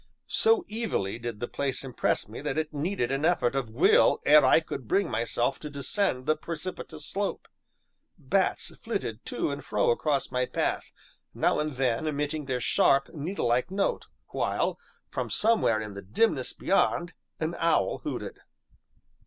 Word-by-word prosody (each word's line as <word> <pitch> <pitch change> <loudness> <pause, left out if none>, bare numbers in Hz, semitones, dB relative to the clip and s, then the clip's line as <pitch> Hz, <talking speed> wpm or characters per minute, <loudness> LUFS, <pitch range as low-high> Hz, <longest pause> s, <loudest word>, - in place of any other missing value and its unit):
So 450 -5 +3
evilly 205 - -2
did 120 -3 -5
the 120 - -3
place 140 -1 -2
impress 130 -3 -1
me - - -8
that - - -2
it 155 -1 -2
needed 145 -4 -1
an 135 +2 -1
effort 160 -8 +2
of 135 -4 -1
will 110 - +4
ere 150 0 +8
I 130 - +6
could 140 -6 -7
bring 195 - +1
myself 120 +3 0
to 150 - -7
descend 140 - -1
the 155 +1 +3
precipitous 160 -2 -6
slope. 200 +4 -3 0.7
Bats - - 0
flitted - - -4
to - - -1
and - - -5
fro - - +2
across 145 - 0
my 125 0 0
path, - - -2 0.4
now - - +2
and 150 -2 -2
then, 125 +2 0
emitting 150 0 -2
their 130 -2 -1
sharp, 135 +3 +3
needlelike 145 -5 0
note, 195 +1 -1 0.2
while, - - -1 0.3
from - - -3
somewhere 215 - +3
in 105 -2 -6
the 100 - -7
dimness 130 - +1
beyond, 175 -3 +1 0.3
an 160 +1 -1
owl 160 - +2
hooted. - - -5
145 Hz, 155 wpm, -28 LUFS, 125-170 Hz, 0.7 s, ere